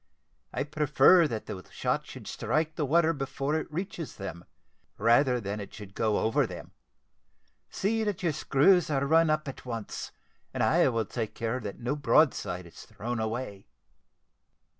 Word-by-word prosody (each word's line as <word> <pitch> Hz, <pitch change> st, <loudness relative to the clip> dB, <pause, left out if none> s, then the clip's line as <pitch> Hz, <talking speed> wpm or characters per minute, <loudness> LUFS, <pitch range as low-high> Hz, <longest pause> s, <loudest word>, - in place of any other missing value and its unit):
I 135 Hz, -, -1 dB
prefer 150 Hz, +3 st, +5 dB
that 110 Hz, -6 st, -4 dB
the 95 Hz, -4 st, -7 dB
shot -, -, -2 dB
should -, -, -10 dB
strike 155 Hz, +1 st, -1 dB
the 150 Hz, -4 st, -1 dB
water 165 Hz, +2 st, +4 dB
before 135 Hz, 0 st, -3 dB
it 160 Hz, 0 st, -2 dB
reaches 170 Hz, -1 st, -5 dB
them, 95 Hz, -4 st, -7 dB, 0.5 s
rather 120 Hz, +4 st, +4 dB
than 100 Hz, -1 st, -4 dB
it 100 Hz, -, -8 dB
should 100 Hz, -3 st, -10 dB
go 110 Hz, 0 st, +1 dB
over 110 Hz, -, +2 dB
them. -, -, -9 dB, 1.0 s
See 220 Hz, +3 st, 0 dB
that 205 Hz, -3 st, -2 dB
your 170 Hz, -, +2 dB
screws 155 Hz, +6 st, +3 dB
are 140 Hz, -2 st, +1 dB
run 160 Hz, +2 st, +4 dB
up 155 Hz, 0 st, 0 dB
at 135 Hz, -, -7 dB
once, 115 Hz, -4 st, -5 dB, 0.4 s
and -, -, +1 dB
I -, -, +4 dB
will 115 Hz, -3 st, 0 dB
take 110 Hz, +1 st, -4 dB
care 115 Hz, +2 st, -2 dB
that 105 Hz, -4 st, -7 dB
no 125 Hz, +4 st, -1 dB
broadside 120 Hz, -, +2 dB
is 85 Hz, -, -12 dB
thrown 120 Hz, +2 st, -5 dB
away. 110 Hz, -2 st, -4 dB
135 Hz, 160 wpm, -29 LUFS, 110-155 Hz, 1.0 s, prefer